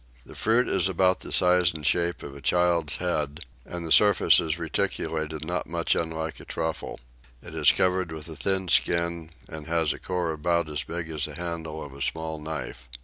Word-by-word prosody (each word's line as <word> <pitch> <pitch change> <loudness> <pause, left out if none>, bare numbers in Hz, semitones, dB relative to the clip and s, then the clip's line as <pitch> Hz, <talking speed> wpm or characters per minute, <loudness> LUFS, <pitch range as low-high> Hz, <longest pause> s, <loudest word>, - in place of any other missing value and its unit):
The - - -12
fruit 115 +3 +2
is 95 - +1
about 95 0 +2
the - - -8
size 90 -1 +3
and 75 -2 -6
shape 85 +3 +1
of 70 -1 -8
a 70 - -10
child's 85 -1 +2
head, 75 -5 -2 0.3
and 85 -1 -6
the 80 - -6
surface 105 +1 +6
is - - -1
reticulated 80 -1 -2
not 90 +2 -2
much 85 0 0
unlike 80 -1 -3
a - - -12
truffle: 80 -1 -4 0.4
it - - -10
is - - +5
covered 90 -2 +1
with 80 0 -7
a 80 - -8
thin 95 +1 -1
skin, 85 -1 +1 0.2
and 80 -2 -8
has 80 -2 +1
a - - -10
core 90 -3 -2
about 85 +1 0
as 75 -2 -2
big 85 -1 -5
as 75 -3 0
the - - -7
handle 80 -3 -5
of 70 - -11
a 70 - -10
small 80 +2 -1
knife. 75 0 -6
85 Hz, 200 wpm, -26 LUFS, 80-90 Hz, 0.4 s, surface